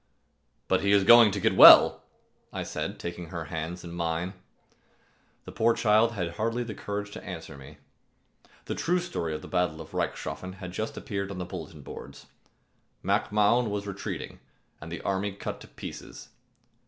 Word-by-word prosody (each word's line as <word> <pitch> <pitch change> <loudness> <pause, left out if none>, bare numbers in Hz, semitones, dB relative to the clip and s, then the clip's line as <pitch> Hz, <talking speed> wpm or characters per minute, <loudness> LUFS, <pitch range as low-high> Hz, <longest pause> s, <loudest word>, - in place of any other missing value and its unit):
"But 95 - +2
he 100 +1 +2
is 100 -1 +5
going 120 +1 +8
to 100 0 -3
get - - +1
well," - - +9 0.5
I - - -4
said, - - -4
taking 85 0 -6
her 85 0 -6
hands 80 +3 -4
in 85 - -8
mine. 85 +2 -2 1.1
The - - -8
poor 115 +1 +2
child 110 +1 +3
had 85 -5 -4
hardly 115 +3 -1
courage 105 0 -5
to - - -9
answer 80 -5 -8
me. 70 -1 -13 0.9
The - - -3
true 180 +2 0
story 170 - -3
of 75 - -7
the - - -9
battle 90 -3 -1
of 80 - -11
Reichshoffen 95 0 -4
had 90 -1 -8
just 110 +4 -4
appeared 100 -5 -4
on 100 - -6
the 90 - -4
bulletin 80 -5 -9
boards. - - -10 0.8
Mac - - 0
Mahon 105 +3 +3
was 100 0 -3
retreating 100 -1 -6 0.4
and 80 +2 -9
the 85 - -5
army 100 +1 -1
cut 100 - -6
to - - -12
pieces. - - -10
95 Hz, 170 wpm, -27 LUFS, 85-105 Hz, 1.1 s, well